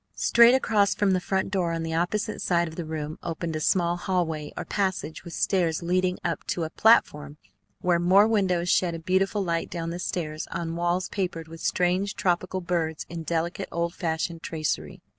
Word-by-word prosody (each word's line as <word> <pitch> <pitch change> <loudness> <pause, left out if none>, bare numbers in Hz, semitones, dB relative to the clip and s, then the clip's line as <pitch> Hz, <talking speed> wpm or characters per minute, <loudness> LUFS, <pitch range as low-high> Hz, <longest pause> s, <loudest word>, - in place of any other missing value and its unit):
Straight 235 +1 +6
across 210 -6 +2
from 205 -2 +2
the 185 - +2
front 190 +1 -1
door 180 -4 0
on 165 0 -2
the 165 0 -3
opposite 200 +6 -1
side 170 -1 +1
of 160 - -9
the 170 - -4
room 155 -1 -5
opened 165 -1 -4
a - - -1
small 175 +2 +1
hallway 170 -5 -2
or - - -4
passage 190 -6 -2
with 170 - -9
stairs 170 -4 +1
leading 180 +1 +1
up 170 -1 -2
to 170 - -1
a 160 - -4
platform 150 -10 +3 0.4
where 175 -1 +2
more 190 +4 +5
windows 185 -6 +1
shed 175 -1 +2
a - - -5
beautiful 190 +4 +1
light 170 -2 -1
down 165 -1 -4
the 175 - -5
stairs 155 -4 -3
on 165 -1 -4
walls 175 +1 0
papered 175 -5 -3
with 165 0 -11
strange 185 +3 +1
tropical 185 +1 0
birds 165 -3 -2
in 170 -1 -5
delicate 170 +4 -2
old 170 0 -1
fashioned 165 0 -2
tracery. 150 - -3
175 Hz, 190 wpm, -26 LUFS, 165-185 Hz, 0.4 s, Straight